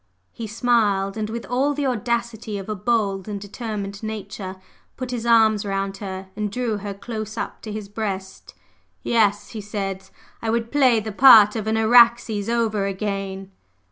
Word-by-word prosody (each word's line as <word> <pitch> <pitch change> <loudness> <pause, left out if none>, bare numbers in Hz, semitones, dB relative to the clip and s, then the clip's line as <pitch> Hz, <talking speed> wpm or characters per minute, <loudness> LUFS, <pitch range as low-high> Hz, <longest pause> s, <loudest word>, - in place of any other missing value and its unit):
He 230 - -7
smiled; 210 -3 +1
and 215 -1 -3
with 230 +1 -5
all 270 +4 0
the 290 0 -1
audacity 235 -3 -2
of 195 - -7
a 215 - -2
bold 205 -2 0
and 205 -1 -4
determined 205 -1 -6
nature, 205 -3 -6 0.4
put 255 -1 -5
his 235 -1 -3
arms 220 -3 +4
round 195 -1 -2
her 190 -1 -7
and 210 -1 -3
drew 240 -2 -1
her 200 0 -6
close 215 +1 -6
up - - -5
to 215 - -7
his 210 -1 -6
breast. 195 -2 -5 0.5
"Yes," 205 -3 +2
he 220 - -6
said, 195 -2 -5 0.3
"I 225 - -2
would 230 0 -1
play 260 -6 +4
the 215 +1 -5
part 210 -2 +8
of 220 -1 -3
an 220 0 +1
Araxes 230 -2 +4
over 220 -4 0
again!" 195 -1 -4
215 Hz, 170 wpm, -22 LUFS, 200-230 Hz, 0.5 s, part